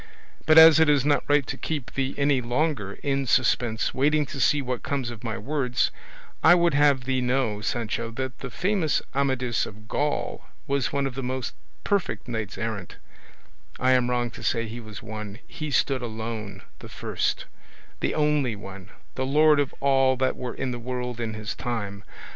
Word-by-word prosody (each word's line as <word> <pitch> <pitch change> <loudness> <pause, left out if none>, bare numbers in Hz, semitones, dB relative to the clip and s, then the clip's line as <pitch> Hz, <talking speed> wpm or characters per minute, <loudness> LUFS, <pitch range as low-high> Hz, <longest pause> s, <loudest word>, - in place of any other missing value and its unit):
But 155 0 +6
as 160 -1 +10
it 160 -1 +5
is 145 -2 +3
not 145 -3 +3
right 145 -2 +4
to 135 - -4
keep 145 -4 -4
thee 135 0 -2
any 140 -2 +2
longer 120 -4 -1
in 135 -1 0
suspense, 120 -3 +2
waiting 150 +3 +2
to 135 - -7
see 145 +4 +3
what 125 -3 -3
comes 135 -4 -2
of 115 -3 -10
my 115 -1 -3
words, 130 -2 0 0.5
I 175 - +8
would 170 -2 +3
have 140 -2 +4
thee 130 0 0
know, 125 -4 0
Sancho, 115 0 -2
that 130 +2 -5
the - - -6
famous 185 -5 0
Amadis 130 -4 0
of 110 +1 -12
Gaul 145 +4 -2 0.2
was 140 -3 0
one 140 -1 0
of 135 - -3
the 135 - -4
most 130 -2 -3 0.3
perfect 200 -8 -1
knights 110 -4 -4
errant 110 -5 -4 0.8
I 130 +1 +3
am 125 -1 +3
wrong 120 -1 0
to - - -11
say 115 0 0
he 115 +3 -7
was 110 -3 -10
one; 105 -1 -7
he 155 -2 -6
stood 135 -1 +1
alone, 110 -4 -5 0.2
the - - -10
first, - - -2 0.5
the - - -1
only 150 -6 +1
one, 95 -2 -10 0.2
the 130 - -2
lord 150 +1 +5
of 140 -2 0
all 135 -1 +3
that 130 0 +1
were 125 -1 -5
in 130 - -2
the 120 - -4
world 125 0 -4
in 110 -2 -3
his 110 0 -4
time. 105 -4 -4
130 Hz, 185 wpm, -25 LUFS, 115-140 Hz, 0.8 s, as